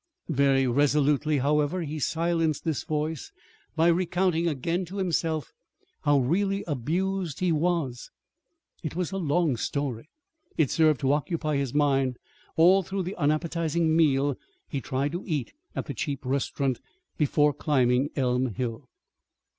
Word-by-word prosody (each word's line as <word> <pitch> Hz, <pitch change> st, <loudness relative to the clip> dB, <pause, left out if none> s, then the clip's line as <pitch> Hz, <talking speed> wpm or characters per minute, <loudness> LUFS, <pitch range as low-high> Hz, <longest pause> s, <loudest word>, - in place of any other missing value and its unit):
Very 135 Hz, -2 st, +3 dB
resolutely, 145 Hz, +3 st, +2 dB
however, 150 Hz, +5 st, +1 dB
he 155 Hz, 0 st, -4 dB
silenced 165 Hz, 0 st, 0 dB
this 160 Hz, -4 st, 0 dB
voice 155 Hz, -1 st, -3 dB, 0.4 s
by 165 Hz, 0 st, +3 dB
recounting 175 Hz, 0 st, +2 dB
again 165 Hz, +4 st, -1 dB
to 190 Hz, +4 st, -8 dB
himself 165 Hz, -5 st, -1 dB, 0.5 s
how 145 Hz, -1 st, +5 dB
really 195 Hz, +9 st, +1 dB
abused 170 Hz, +4 st, -2 dB
he 180 Hz, -1 st, +1 dB
was. 155 Hz, -6 st, -1 dB, 0.7 s
It 155 Hz, -3 st, -5 dB
was 180 Hz, 0 st, -2 dB
a 195 Hz, -, -3 dB
long 160 Hz, -5 st, +1 dB
story. 140 Hz, +2 st, -3 dB, 0.5 s
It 155 Hz, -5 st, +2 dB
served 155 Hz, -4 st, +3 dB
to 135 Hz, -, +2 dB
occupy 155 Hz, 0 st, -1 dB
his 140 Hz, -1 st, -2 dB
mind 135 Hz, -4 st, +2 dB, 0.4 s
all 180 Hz, +4 st, +6 dB
through 190 Hz, +1 st, -3 dB
the 185 Hz, +3 st, -5 dB
unappetizing 160 Hz, +1 st, +1 dB
meal 145 Hz, -4 st, +2 dB, 0.3 s
he 140 Hz, -, -3 dB
tried 135 Hz, +3 st, -1 dB
to 175 Hz, +3 st, -4 dB
eat 150 Hz, -8 st, -2 dB, 0.2 s
at -, -, -3 dB
the 140 Hz, -, -5 dB
cheap 140 Hz, +2 st, -4 dB
restaurant 135 Hz, 0 st, -1 dB, 0.4 s
before 150 Hz, 0 st, +3 dB
climbing 135 Hz, -2 st, +2 dB
Elm 125 Hz, -4 st, 0 dB
Hill. 125 Hz, +1 st, -4 dB
150 Hz, 140 wpm, -27 LUFS, 140-170 Hz, 0.7 s, all